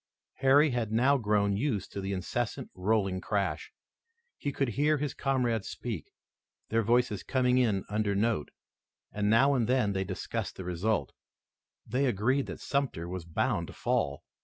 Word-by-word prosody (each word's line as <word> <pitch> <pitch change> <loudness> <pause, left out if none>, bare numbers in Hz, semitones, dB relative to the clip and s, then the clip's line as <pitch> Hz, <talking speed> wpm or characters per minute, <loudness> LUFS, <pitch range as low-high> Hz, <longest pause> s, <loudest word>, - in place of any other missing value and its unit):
Harry 140 +3 +5
had 120 -3 -1
now 130 +6 +4
grown 105 -5 +2
used 110 -3 -1
to 100 - -4
this 95 +1 -3
incessant, 100 +5 -3
rolling 95 -1 0
crash. 100 -2 -2 0.6
He 145 - -3
could 135 -2 0
hear 150 +6 +2
his 145 -1 -2
comrades 120 -6 0
speak, - - -5 0.6
their 115 +1 +2
voices 115 -2 +2
coming 125 -1 +2
in 115 -5 +3
an 95 - -4
under 105 -1 0
note, 105 -6 0 0.6
and 105 0 0
now 135 +6 +5
and 120 -5 +1
then 125 -6 +2
they 95 0 0
discussed 95 -1 -4
the 95 - -7
result. 95 +5 -1 0.7
They 130 +5 +1
agreed 130 +5 +1
that - - -6
Sumter 135 - -1
was 90 -1 -5
bound 85 - 0
to - - -10
fall. 70 0 -1
110 Hz, 160 wpm, -30 LUFS, 100-130 Hz, 0.7 s, Harry